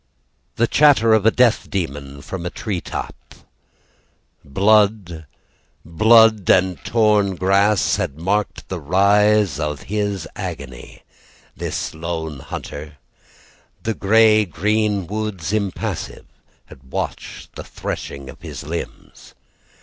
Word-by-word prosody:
The 120 - +2
chatter 130 -4 +4
of 110 -1 +3
a - - +9
death 120 0 +2
demon 70 -6 -5
from 85 +4 -6
a 90 - -3
tree 95 -3 -4
top. - - -8 1.1
Blood 100 -2 +1 0.6
blood 110 +4 +4
and 95 -1 +3
torn 105 -4 +2
grass 100 +3 +2
Had 90 -8 -3
marked 100 +5 -2
the 95 - -5
rise 100 +1 +3
of 75 -2 -3
his 100 -4 -3
agony 65 -4 -8 0.5
This - - -4
lone 80 -2 -5
hunter. 75 +3 -8 0.9
The 115 - -1
grey 110 +1 +4
green 105 +2 0
woods 105 -4 -4
impassive 100 -3 -3 0.4
Had 65 0 -17
watched - - -5
the - - -7
threshing 70 -1 -6
of - - -12
his - - -8
limbs. 80 +4 -8
95 Hz, 110 wpm, -20 LUFS, 80-105 Hz, 1.1 s, a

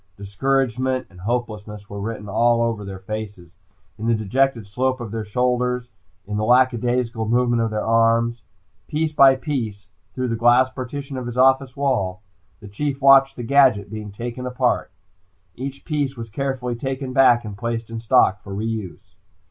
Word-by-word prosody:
Discouragement 130 +4 -1
and 90 -1 -14
hopelessness 105 -2 -4
were 100 0 -7
written 105 0 -5
all 115 +3 +2
over 115 -3 -2
their 100 -1 -7
faces, 100 -3 -7 0.5
in 110 - -3
the 115 - +3
dejected 120 +2 0
slope 130 +6 -1
of 115 -4 -6
their 110 0 -3
shoulders, 125 +2 -1 0.3
in 105 +1 -4
the 105 - -1
lackadaisical 120 -1 +2
movements 120 0 +2
of - - -1
their 110 -1 -3
arms. 115 +1 +2 0.5
Piece 155 0 -1
by 135 -2 +7
piece, 125 -7 -4 0.3
through 130 -1 -2
the 115 - 0
glass 120 +3 +4
partition 135 +2 -6
of 125 -1 -5
his 120 0 -6
office 130 0 +3
wall, 105 -9 -1 0.4
the 105 - -10
Chief 135 +7 -3
watched 135 0 +6
the 120 - -6
gadget 125 -6 +3
being 105 -2 -6
taken 120 +4 -6
apart. 125 0 0 0.6
Each 135 +2 -7
piece 145 -4 -2
was 115 -2 -7
carefully 130 -1 -2
taken 130 +1 -4
back 120 -3 +5
and 105 -2 -6
placed 115 +1 -4
in 115 - -4
stock 105 -3 +3
for 100 -1 -8
re 105 +2 -3
use. 105 -4 -6
120 Hz, 170 wpm, -22 LUFS, 110-130 Hz, 0.6 s, by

